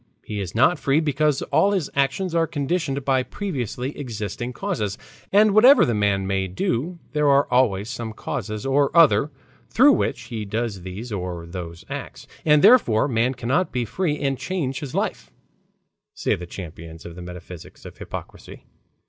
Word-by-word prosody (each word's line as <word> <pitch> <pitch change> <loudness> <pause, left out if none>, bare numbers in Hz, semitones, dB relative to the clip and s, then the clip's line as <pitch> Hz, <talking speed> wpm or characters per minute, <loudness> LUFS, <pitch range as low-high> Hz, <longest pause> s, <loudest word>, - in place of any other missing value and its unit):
He 105 -1 -4
is 95 0 -6
not 145 +8 +4
free, 140 +2 +2
because 150 -2 +1
all 200 +1 +4
his 180 -8 0
actions 140 +6 0
are 165 -1 +2
conditioned 145 -2 -2
by 130 -2 +3
previously 130 - -4
existing 120 -2 -5
causes. 125 - -3 0.3
And 210 +1 +5
whatever 245 +7 +7
the 120 - 0
man 100 -2 +1
may 95 0 -1
do 160 - -2 0.2
there 150 -1 +2
are 140 0 +4
always 110 -6 +2
some 115 -2 -5
causes 110 0 -5
or 140 +1 +3
other 155 -2 +5 0.4
through 270 +5 +6
which - - 0
he 115 -4 -5
does 105 -1 -3
these 95 +7 -7
or 90 -4 -4
those 85 -1 -8
acts, - - -7 0.2
and 150 -1 +5
therefore 190 - +5
man 125 0 +1
cannot 130 +10 0
be 125 -2 -1
free 155 - -1
and 135 -2 -1
change 150 -8 -2
his 140 -4 -7
life," - - -2 0.9
say - - 0
the 90 +1 -5
champions 80 -2 -9
of 85 - -8
the 90 - -9
metaphysics 90 -1 -10
of - - -11
hypocrisy. - - -9
130 Hz, 165 wpm, -23 LUFS, 100-150 Hz, 0.9 s, whatever